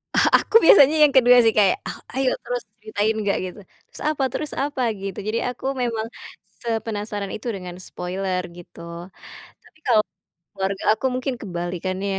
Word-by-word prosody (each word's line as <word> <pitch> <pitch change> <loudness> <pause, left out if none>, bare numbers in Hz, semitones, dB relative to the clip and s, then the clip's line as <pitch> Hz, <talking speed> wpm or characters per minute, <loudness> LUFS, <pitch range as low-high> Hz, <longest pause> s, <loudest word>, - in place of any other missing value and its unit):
Ah, - - +5 0.2
aku - - -7
biasanya 300 -4 +8
yang 300 - +7
kedua, 250 -1 +7
sih, 225 - +5
kayak, 195 -3 +4
"Oh, - - -6 0.2
ayo, 265 0 +1
terus 245 0 -3 0.2
ceritain, 215 0 -1
enggak," 205 -2 0
gitu. 185 +3 -8 0.3
"Terus, - - -12
apa 300 -3 -1
terus, 305 - -4
apa?" 280 -1 -2 0.2
Gitu. 195 -1 -5
Jadi, 220 +2 0
aku 250 +1 -8 0.2
memang 230 -2 -1 0.6
sepenasaran 210 -3 -3
itu 220 - -6
dengan 180 -2 -7
spoiler, 185 +1 -3 0.2
gitu. 170 0 -10 0.5
Tapi, 310 - -23
kalau 225 -4 +5 0.5
keluarga 195 0 -3
aku 220 - -1
mungkin 255 +1 -2
kebalikannya, 185 0 -4
215 Hz, 160 wpm, -23 LUFS, 190-245 Hz, 0.6 s, biasanya